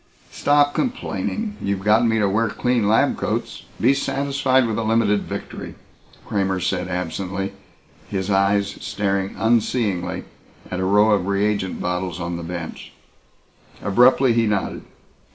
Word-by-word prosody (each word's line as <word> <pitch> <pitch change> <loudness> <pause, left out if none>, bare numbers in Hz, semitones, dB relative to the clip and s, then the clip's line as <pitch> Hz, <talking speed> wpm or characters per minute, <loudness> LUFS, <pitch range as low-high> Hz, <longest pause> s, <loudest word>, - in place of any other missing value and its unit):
"Stop 145 0 +3
complaining. 225 -4 -2
You've 100 -1 -2
gotten 110 +3 +4
me 115 - +2
to 105 -2 +2
wear 110 +3 +1
clean 120 -1 0
lab 110 - +3
coats. - - -3
Be 130 +4 +4
satisfied 135 -2 +1
with 110 -1 -1
a - - -1
limited 110 -2 +2
victory," - - -7 0.5
Kramer 95 -2 0
said 90 0 -1
absently, 95 +2 -3 0.6
his 95 0 -2
eyes 100 +1 +2
staring 100 -1 -1
unseeingly 105 -6 0 0.5
at 90 - -2
a 95 - 0
row 105 +3 +4
of 100 -3 +2
reagent 100 -1 0
bottles 90 0 -2
on 85 0 -3
the - - -6
bench. 85 -1 -7 0.9
Abruptly 125 +4 +4
he 115 -1 +2
nodded. 105 -2 -1
100 Hz, 135 wpm, -22 LUFS, 95-115 Hz, 0.9 s, gotten